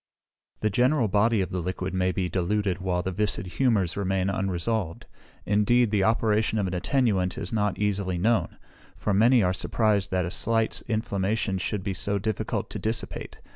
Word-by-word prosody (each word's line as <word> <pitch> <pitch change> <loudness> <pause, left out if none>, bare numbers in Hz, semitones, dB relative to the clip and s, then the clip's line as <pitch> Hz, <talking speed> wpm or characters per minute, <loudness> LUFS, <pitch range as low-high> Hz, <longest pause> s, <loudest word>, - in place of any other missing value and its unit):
The 110 - +1
general 125 +3 +2
body 105 +2 +2
of 95 - -3
the 90 - -2
liquid 95 +1 -3
may 95 0 +1
be 90 0 -1
diluted 95 +1 -1
while 90 -2 -1
the 95 - -2
viscid 105 +1 0
humours 95 -3 +1
remain 95 -1 0
unresolved. 95 -1 -2 0.4
Indeed, 105 +3 +3
the 100 -3 +2
operation 110 0 +2
of 100 - +1
an 95 - -3
attenuant 95 -3 0
is 90 - -5
not 105 -3 0
easily 100 -3 -1
known; 110 +6 +1 0.4
for 105 - -1
many 115 +3 +5
are 90 0 +2
surprised 105 +1 +1
that 90 -2 0
a 85 - -4
slight 115 +2 0
inflammation 100 -2 -1
should 100 +1 -3
be 95 - -2
so 100 +2 -1
difficult 105 0 -3
to - - -4
dissipate. 110 -3 -4
100 Hz, 175 wpm, -26 LUFS, 95-110 Hz, 0.4 s, many